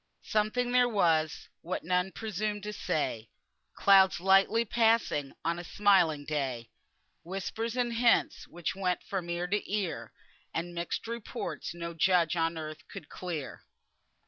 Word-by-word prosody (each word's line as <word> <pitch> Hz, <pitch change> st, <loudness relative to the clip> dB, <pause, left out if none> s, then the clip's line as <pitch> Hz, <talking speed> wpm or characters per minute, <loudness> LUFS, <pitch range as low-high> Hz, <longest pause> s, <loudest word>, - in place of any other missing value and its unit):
"Something 220 Hz, +4 st, 0 dB
there 250 Hz, 0 st, +4 dB
was, 160 Hz, -7 st, +1 dB
what, 185 Hz, +3 st, -4 dB
none 180 Hz, +2 st, +1 dB
presumed 210 Hz, -1 st, -3 dB
to 210 Hz, 0 st, -4 dB
say, 115 Hz, -, -2 dB, 0.5 s
Clouds 190 Hz, -2 st, +5 dB
lightly 195 Hz, +5 st, +4 dB
passing 225 Hz, -, +2 dB
on 170 Hz, +1 st, 0 dB
a -, -, -6 dB
smiling 175 Hz, -6 st, +3 dB
day, 135 Hz, -6 st, -3 dB, 0.5 s
Whispers 220 Hz, +6 st, -4 dB
and 240 Hz, -1 st, 0 dB
hints 235 Hz, 0 st, +2 dB
which 175 Hz, +1 st, -4 dB
went 185 Hz, -2 st, -1 dB
from 185 Hz, -3 st, -4 dB
ear 170 Hz, +1 st, -1 dB
to 200 Hz, +2 st, -2 dB
ear, 200 Hz, -5 st, -2 dB, 0.4 s
And 175 Hz, +1 st, -3 dB
mixed 170 Hz, +4 st, -3 dB
reports 215 Hz, -8 st, -5 dB
no 170 Hz, 0 st, -5 dB
judge 170 Hz, 0 st, +3 dB
on 165 Hz, 0 st, 0 dB
earth 155 Hz, -1 st, -6 dB
could 190 Hz, -7 st, -10 dB
clear." 170 Hz, -6 st, -6 dB
180 Hz, 140 wpm, -30 LUFS, 165-210 Hz, 0.5 s, Clouds